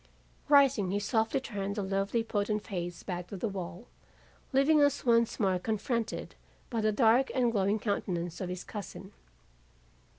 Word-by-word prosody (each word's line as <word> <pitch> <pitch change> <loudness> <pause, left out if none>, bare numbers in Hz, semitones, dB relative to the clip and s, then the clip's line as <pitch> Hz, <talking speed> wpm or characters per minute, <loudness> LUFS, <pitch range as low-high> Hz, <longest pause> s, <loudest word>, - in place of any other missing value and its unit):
Rising, 275 -9 +5
he 200 +2 0
softly 220 +4 +1
turned 200 -6 -4
the 205 - -2
lovely, 195 +4 0
potent 210 -1 -1
face 175 -3 -5
back 180 -2 -5
to 200 - -7
the 185 - -2
wall, 190 0 -6 0.7
leaving 290 +3 +4
us 285 -2 +2
once 235 -1 +3
more 190 -3 +2
confronted 225 +3 -2 0.4
by 230 -2 0
the 215 0 +2
dark 235 +4 +4
and 245 -2 +3
glowing 200 -1 +1
countenance 175 -5 -2
of 185 - -3
his 180 0 -5
cousin. 205 -3 -8
210 Hz, 155 wpm, -30 LUFS, 195-235 Hz, 0.7 s, Rising